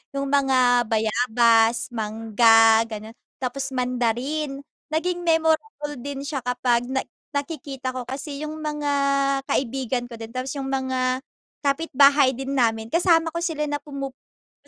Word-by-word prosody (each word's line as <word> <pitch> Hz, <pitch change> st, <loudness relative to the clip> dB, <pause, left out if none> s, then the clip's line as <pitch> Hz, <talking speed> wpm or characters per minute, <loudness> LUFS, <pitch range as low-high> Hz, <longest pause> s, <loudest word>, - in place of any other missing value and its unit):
Yung 275 Hz, 0 st, -1 dB
mga 255 Hz, -3 st, +4 dB
bayabas, 225 Hz, +1 st, +3 dB
mangga, 225 Hz, 0 st, +4 dB
ganon. 220 Hz, +1 st, -8 dB, 0.2 s
Tapos 265 Hz, +1 st, -3 dB
mandarin. 255 Hz, +4 st, -1 dB, 0.3 s
Naging 350 Hz, +3 st, -1 dB
memorable 320 Hz, -1 st, 0 dB
din 280 Hz, -1 st, -5 dB
siya 285 Hz, -1 st, -3 dB
kapag 250 Hz, -1 st, +1 dB
na 265 Hz, 0 st, 0 dB, 0.3 s
nakikita 275 Hz, -3 st, -4 dB
ko 250 Hz, -, -3 dB
kasi 280 Hz, +3 st, -6 dB
yung 310 Hz, +1 st, -6 dB
mga 300 Hz, -1 st, -3 dB, 0.6 s
kaibigan 255 Hz, -1 st, -1 dB
ko 230 Hz, -, -9 dB
din, 225 Hz, -, -6 dB
tapos 255 Hz, 0 st, -3 dB
yung 270 Hz, -, -4 dB
mga 260 Hz, -1 st, -1 dB, 0.4 s
kapitbahay 280 Hz, -2 st, +4 dB
din 270 Hz, +1 st, -5 dB
namin 225 Hz, -1 st, 0 dB
kasama 330 Hz, -1 st, +3 dB
ko 335 Hz, -, -3 dB
sila 325 Hz, -3 st, -2 dB
na 290 Hz, -, -1 dB
pumupunta 275 Hz, -2 st, -10 dB
265 Hz, 130 wpm, -23 LUFS, 240-290 Hz, 0.6 s, mga